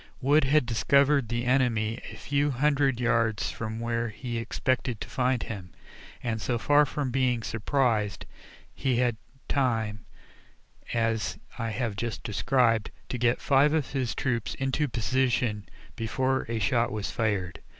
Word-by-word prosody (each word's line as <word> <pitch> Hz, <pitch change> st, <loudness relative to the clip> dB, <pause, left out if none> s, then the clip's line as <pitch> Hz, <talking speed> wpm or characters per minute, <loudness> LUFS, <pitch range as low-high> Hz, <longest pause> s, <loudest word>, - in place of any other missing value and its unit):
Wood 145 Hz, +2 st, +4 dB
had 145 Hz, 0 st, +3 dB
discovered 140 Hz, +2 st, +3 dB
the 120 Hz, +1 st, -1 dB
enemy 120 Hz, -3 st, +1 dB
a -, -, -9 dB
few 145 Hz, +1 st, 0 dB
hundred 140 Hz, -1 st, +2 dB
yards 115 Hz, -3 st, +1 dB
from 110 Hz, 0 st, -5 dB
where 115 Hz, 0 st, -1 dB
he 120 Hz, +2 st, -4 dB
expected 125 Hz, 0 st, -1 dB
to -, -, -6 dB
find 125 Hz, -2 st, 0 dB
him, 95 Hz, -5 st, -7 dB, 0.5 s
and 110 Hz, -2 st, -2 dB
so 120 Hz, +3 st, 0 dB
far 145 Hz, +4 st, +4 dB
from 135 Hz, -2 st, -2 dB
being 125 Hz, -3 st, +1 dB
"surprised," 115 Hz, -1 st, 0 dB, 0.5 s
he 130 Hz, -2 st, 0 dB
had 120 Hz, -1 st, +2 dB, 0.3 s
time, 115 Hz, -6 st, 0 dB, 0.8 s
as 115 Hz, -1 st, 0 dB, 0.2 s
I 115 Hz, -1 st, -1 dB
have 115 Hz, -1 st, -2 dB
just 115 Hz, +2 st, -4 dB
described, 115 Hz, 0 st, +2 dB, 0.2 s
to 125 Hz, -, -3 dB
get 120 Hz, +1 st, +2 dB
five 140 Hz, +2 st, +4 dB
of 155 Hz, -4 st, 0 dB
his 125 Hz, -5 st, -1 dB
troops 120 Hz, -4 st, -1 dB
into 135 Hz, +3 st, 0 dB
position 120 Hz, -3 st, 0 dB, 0.3 s
before 130 Hz, +3 st, -1 dB
a 115 Hz, -, -1 dB
shot 120 Hz, +1 st, +1 dB
was 105 Hz, -1 st, -3 dB
fired. 95 Hz, -7 st, -1 dB
120 Hz, 145 wpm, -27 LUFS, 115-135 Hz, 0.8 s, Wood